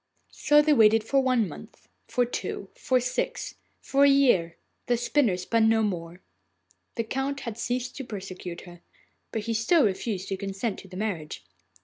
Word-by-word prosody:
So 295 0 +4
they 305 0 +4
waited 220 -3 +5
for 275 +5 +2
one 255 -5 +2
month, - - -12 0.2
for 245 - +1
two, 240 - -5
for 255 -1 +1
six, - - -3 0.3
for 275 +1 +2
a 280 - +7
year. 245 -12 +3 0.3
The 240 -1 +2
spinner 240 -5 +1
spun 220 +5 +2
no 225 0 +3
more. 175 -3 -4 0.7
The 230 - -1
Count 270 +4 -3
had 230 -4 -5
ceased 245 +2 -3
to 270 - -4
persecute 185 -5 -7
her, 175 -2 -13 0.5
but 220 - -3
he 230 - -2
still 240 +7 +3
refused 195 -1 -2
his 195 -1 -3
consent 195 +2 -3
to - - -13
the 185 0 -10
marriage. 175 - -4
225 Hz, 170 wpm, -26 LUFS, 195-255 Hz, 0.7 s, a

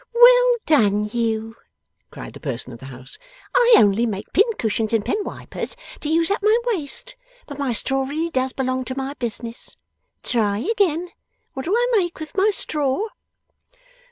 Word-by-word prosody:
'Well - - +7
done 210 -9 +3
you!' 225 -1 -1 0.5
cried - - -9
the - - -11
person 130 -3 -3
of 115 - -11
the 135 - -10
house. 130 0 -9 0.3
'I 485 -1 +6
only 210 +3 +4
make 200 -2 -5
pincushions 230 - +1
and 220 -2 +1
pen 420 - -1
wipers, - - -6 0.2
to 300 - -4
use 330 +3 +2
up 410 - 0
my 430 +2 +4
waste. 465 - -3 0.3
But 285 -1 -9
my 275 -3 0
straw 270 +4 0
really 315 +5 -3
does 260 -2 0
belong 255 -1 -2
to 260 +1 -5
my 270 +1 -3
business. 235 -2 -4 0.5
Try 210 -4 +1
again. 355 - 0 0.4
What 265 - -5
do 375 +6 +1
I 485 +1 +2
make 350 -6 0
with 315 -1 -8
my 400 +2 +4
straw? 300 +2 0
275 Hz, 165 wpm, -22 LUFS, -, 0.5 s, Well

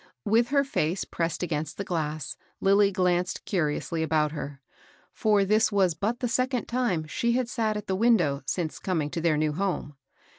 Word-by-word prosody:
With 230 +3 +3
her 280 +2 +3
face 180 - -1
pressed 165 +1 -2
against 155 -3 -3
the 200 - -2
glass, 155 -5 -3 0.2
Lilly 200 +1 +4
glanced 180 -1 0
curiously 165 -2 -1
about 155 -1 +1
her; 145 -2 -6 0.5
for 210 -2 +2
this 215 +3 +3
was 190 -4 +3
but 215 +9 -2
the 245 - +1
second 255 0 0
time 235 -10 0
she 235 +9 0
had 250 -1 +1
sat 220 -3 -1
at 210 - -6
the 190 - -1
window 185 -11 +3
since 165 -4 -2
coming 160 -6 -1
to 165 - -3
their 160 -2 +2
new 155 0 +1
home. 170 -4 -2
185 Hz, 180 wpm, -27 LUFS, 155-220 Hz, 0.5 s, Lilly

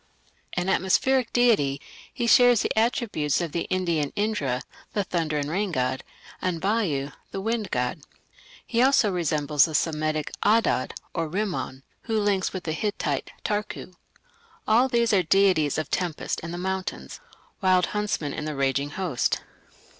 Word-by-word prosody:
An 180 +1 -1
atmospheric 230 +7 +2
deity, 205 - +3 0.3
he 240 - -2
shares 245 -1 +6
the - - -1
attributes 220 - +1
of 170 -3 -3
the 170 - -2
Indian 170 -6 0
Indra, 145 - -1 0.3
the 205 - +1
thunder 165 -5 -1
and 145 -1 -1
rain 190 +5 -1
god, 130 -3 -1 0.4
and 180 -3 -1
Vayu, 170 -9 0 0.2
the 195 - -5
wind 220 0 -2
god; 125 +5 -1 0.6
he 235 0 +1
also 255 -5 +4
resembles 150 -5 +2
the 160 - -4
Semitic 155 -1 0
Adad 210 - +2 0.2
or 165 -2 -2
Rimman, 180 -8 -3 0.2
who 220 -1 0
links 200 -2 +1
with 185 -1 -5
the 160 - -2
Hittite 160 -7 -2 0.2
Tarku. 210 -3 -3 0.7
All 235 +4 +5
these 235 -3 +2
are 195 - +5
deities 180 -5 +3
of 155 -2 -3
tempest 175 -4 -2
and 165 - -6
the 175 - -4
mountains 190 +1 -4 0.4
Wild 185 -2 +4
Huntsmen 210 -8 -1
in 150 - -4
the 155 -1 -3
Raging 140 +1 0
Host. 160 -5 -1
180 Hz, 150 wpm, -25 LUFS, 150-210 Hz, 0.7 s, shares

